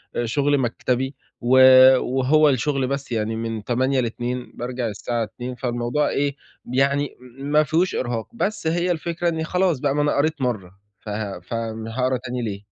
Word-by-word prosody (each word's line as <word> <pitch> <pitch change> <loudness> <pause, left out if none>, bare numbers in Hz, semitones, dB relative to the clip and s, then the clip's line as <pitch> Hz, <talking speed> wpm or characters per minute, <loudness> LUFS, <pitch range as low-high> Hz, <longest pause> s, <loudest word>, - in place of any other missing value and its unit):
آآ 120 - 0
شغل 145 +5 +1
مكتبي 130 +1 -1 0.3
و 125 +2 +3 0.4
وهو 135 +4 +3
الشغل 135 0 0
بس 140 -1 -4
يعني 110 -1 -1
من 115 -1 -4
08:00 130 +4 +1
ل14:00، 120 +1 -3
بارجع 125 0 -3
الساعة 115 +2 -2
14:00، 125 +4 -7
فالموضوع 120 +3 -1
إيه 140 -1 0 0.3
ب 125 - -8
يعني 140 +2 +1 0.2
ما 145 +2 +2
فيهوش 165 +5 +1
إرهاق، 120 -3 -2
بس 210 -6 -2
هي 175 +2 +1
الفكرة 170 +1 -1
إنّي 160 -1 -2
خلاص 180 -3 +1
بقى 140 +1 0
ما 145 - +2
أنا 145 - +1
قريت 155 +1 0
مَرّة، 110 -8 -2 0.3
فه 105 -1 -5
ف - - -10
آمم 115 -1 -4
هاقرا 130 +2 0
تاني 125 0 -5
ليه؟ 100 -3 -4
130 Hz, 175 wpm, -22 LUFS, 120-145 Hz, 0.4 s, و